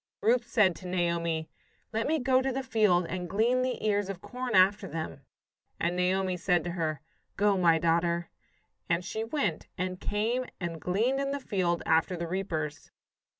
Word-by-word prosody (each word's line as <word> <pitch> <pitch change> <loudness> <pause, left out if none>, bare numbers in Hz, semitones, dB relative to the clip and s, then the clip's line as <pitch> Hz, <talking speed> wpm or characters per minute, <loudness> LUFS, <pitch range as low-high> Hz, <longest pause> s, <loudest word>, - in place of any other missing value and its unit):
Ruth 240 +2 +2
said 210 -7 +3
to 185 - -9
Naomi: 170 -3 0 0.5
"Let 225 +1 0
me 315 +2 +2
go 260 -1 +3
to 265 0 0
the 265 +1 -2
field 210 -8 +3
and 180 0 -4
glean 235 +6 +2
the 255 -3 -2
ears 205 -2 +1
of 195 -3 -5
corn 250 +4 -4
after 195 +2 +4
them." 160 -2 -5 0.6
And 170 +1 0
Naomi 185 0 +1
said 175 -2 +2
to 175 - -3
her, 155 -4 -2 0.4
"Go, 205 0 +3
my 170 -3 +4
daughter." 170 +1 +1 0.6
And 170 +1 +1
she 220 +3 -3
went, 225 - -2
and 185 0 -3
came 230 +5 0
and 170 -3 -4
gleaned 225 +9 +1
in 275 0 -1
the 280 0 -2
field 180 -8 -1
after 165 +3 +2
the 170 - -3
reapers. 165 -4 -3
185 Hz, 175 wpm, -29 LUFS, 170-225 Hz, 0.6 s, after